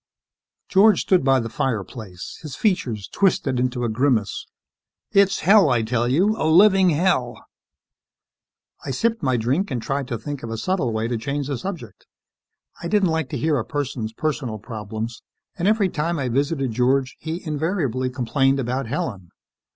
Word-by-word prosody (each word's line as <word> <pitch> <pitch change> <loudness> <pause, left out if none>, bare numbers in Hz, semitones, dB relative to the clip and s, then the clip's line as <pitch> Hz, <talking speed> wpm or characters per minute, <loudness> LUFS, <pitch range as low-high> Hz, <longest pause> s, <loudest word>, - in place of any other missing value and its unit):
George 205 +2 +5
stood 185 -5 +2
by 135 0 +4
the 115 - -3
fireplace, 110 -5 -4
his 150 -4 -7
features 120 - -1
twisted 140 - +1
into 125 0 -1
a - - +1
grimace. 115 -2 0 0.6
"It's 200 -2 +3
hell, 195 -2 +6
I 120 -3 +2
tell 120 +1 0
you. 185 - +2
A - - +2
living 190 +2 +6
hell." 150 -7 0 1.4
I - - -6
sipped 230 - 0
my 130 -3 +1
drink 135 - 0
and 125 - -2
tried 135 +3 -3
to 120 - -3
think 145 +4 -6
of 115 - -6
a 115 - -4
subtle 175 - -1
way 110 +1 -1
to 120 -1 -2
change 140 +4 -3
the 140 - -2
subject. 155 - -7 0.7
I 170 - -3
didn't 195 -1 +2
like 160 -4 -1
to - - -3
hear 155 -3 +1
a - - -2
person's 130 -5 -3
personal 130 -4 -3
problems 110 +1 -6 0.3
and 180 +1 -1
every 210 -2 +3
time 170 0 -2
I 135 -3 -2
visited 135 +1 0
George, 125 +3 +1
he 165 +3 -5
invariably 150 - -1
complained 135 +2 +1
about 130 0 -2
Helen. 100 -6 -4
135 Hz, 165 wpm, -22 LUFS, 120-170 Hz, 1.4 s, hell